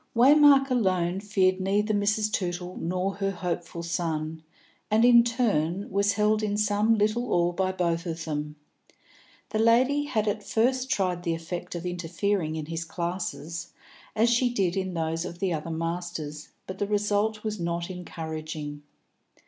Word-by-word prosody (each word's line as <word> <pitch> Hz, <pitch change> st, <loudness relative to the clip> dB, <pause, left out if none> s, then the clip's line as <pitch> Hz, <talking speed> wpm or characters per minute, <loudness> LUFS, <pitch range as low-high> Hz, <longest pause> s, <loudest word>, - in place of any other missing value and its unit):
Waymark 275 Hz, +2 st, +6 dB
alone 185 Hz, -6 st, +1 dB
feared 195 Hz, -2 st, +1 dB
neither 205 Hz, +3 st, +1 dB
Mrs. 210 Hz, +1 st, +1 dB
Tootle 180 Hz, -2 st, -3 dB
nor 185 Hz, +3 st, -1 dB
her 195 Hz, -1 st, 0 dB
hopeful 175 Hz, -2 st, -4 dB
son, 160 Hz, -2 st, -2 dB, 0.5 s
and, 220 Hz, +2 st, +4 dB
in 240 Hz, -1 st, +8 dB
turn, 205 Hz, -7 st, 0 dB
was 200 Hz, +1 st, +2 dB
held 210 Hz, +1 st, +2 dB
in 205 Hz, -1 st, -1 dB
some 210 Hz, +1 st, +2 dB
little 215 Hz, +4 st, 0 dB
awe 175 Hz, 0 st, +3 dB
by 185 Hz, +1 st, 0 dB
both 170 Hz, -2 st, -1 dB
of 165 Hz, -1 st, -4 dB
them. 150 Hz, -1 st, -3 dB, 0.9 s
The 215 Hz, -, -1 dB
lady 255 Hz, +6 st, +4 dB
had 220 Hz, -6 st, -1 dB
at 210 Hz, +1 st, 0 dB
first 255 Hz, +4 st, +1 dB
tried 185 Hz, -8 st, 0 dB
the 170 Hz, -2 st, -1 dB
effect 170 Hz, +2 st, -6 dB
of 170 Hz, +1 st, -5 dB
interfering 175 Hz, 0 st, -1 dB
in 155 Hz, -1 st, -4 dB
his 165 Hz, +1 st, -4 dB
classes, 170 Hz, -2 st, -4 dB, 0.4 s
as 230 Hz, +2 st, +3 dB
she 245 Hz, +1 st, +3 dB
did 195 Hz, -6 st, 0 dB
in 190 Hz, -2 st, -2 dB
those 165 Hz, 0 st, -1 dB
of 175 Hz, -1 st, -6 dB
the 185 Hz, -1 st, 0 dB
other 155 Hz, +1 st, -4 dB
masters, 165 Hz, -2 st, -4 dB, 0.2 s
but 190 Hz, 0 st, -7 dB
the 205 Hz, -, 0 dB
result 210 Hz, +1 st, 0 dB
was 215 Hz, -1 st, -3 dB
not 170 Hz, +1 st, -2 dB
encouraging. 155 Hz, -4 st, -6 dB
185 Hz, 155 wpm, -27 LUFS, 170-215 Hz, 0.9 s, in